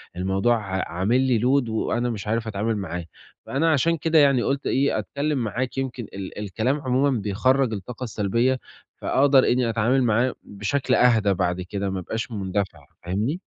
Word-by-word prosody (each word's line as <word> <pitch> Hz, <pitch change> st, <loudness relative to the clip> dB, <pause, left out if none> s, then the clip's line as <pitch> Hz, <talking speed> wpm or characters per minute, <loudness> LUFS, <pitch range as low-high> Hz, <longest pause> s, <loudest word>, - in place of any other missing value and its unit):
الموضوع 95 Hz, +6 st, +1 dB
ع 95 Hz, -3 st, -3 dB
عامل 100 Hz, +9 st, +1 dB
لي 130 Hz, -4 st, +2 dB
load 125 Hz, +1 st, +2 dB
وأنا 120 Hz, +2 st, -1 dB
مش 105 Hz, -3 st, -5 dB
عارف 115 Hz, +1 st, -1 dB
أتعامل 110 Hz, +1 st, -1 dB
معاه، 90 Hz, -3 st, -4 dB, 0.4 s
فأنا 160 Hz, +5 st, +1 dB
عشان 165 Hz, +3 st, +2 dB
كده 160 Hz, +1 st, +3 dB
يعني 140 Hz, -4 st, +4 dB
قُلت 140 Hz, +1 st, -1 dB
إيه، 140 Hz, +2 st, +1 dB
أتكلم 145 Hz, +1 st, -2 dB
معاك، 125 Hz, +4 st, -3 dB
يمكن 130 Hz, -2 st, -3 dB
ال 95 Hz, +1 st, -7 dB
الكلام 110 Hz, +8 st, -1 dB
عمومًا 130 Hz, -1 st, +1 dB
بيخرَّج 125 Hz, +5 st, +1 dB
الطاقة 115 Hz, +5 st, -6 dB
السلبية 115 Hz, +4 st, 0 dB, 0.4 s
فاقدر 135 Hz, +1 st, +4 dB
إنّي 125 Hz, -1 st, +2 dB
أتعامل 120 Hz, +4 st, +2 dB
معاه 120 Hz, +3 st, +2 dB
بشكل 105 Hz, +7 st, -2 dB
أهدى 110 Hz, -5 st, +4 dB
بعد 90 Hz, 0 st, -1 dB
كده، 100 Hz, +2 st, -3 dB
ما 95 Hz, 0 st, -3 dB
أبقاش 110 Hz, +6 st, -4 dB
مندفع، 100 Hz, -1 st, -3 dB, 0.2 s
فاهمني؟ 105 Hz, -, -1 dB
115 Hz, 165 wpm, -24 LUFS, 100-130 Hz, 0.4 s, يعني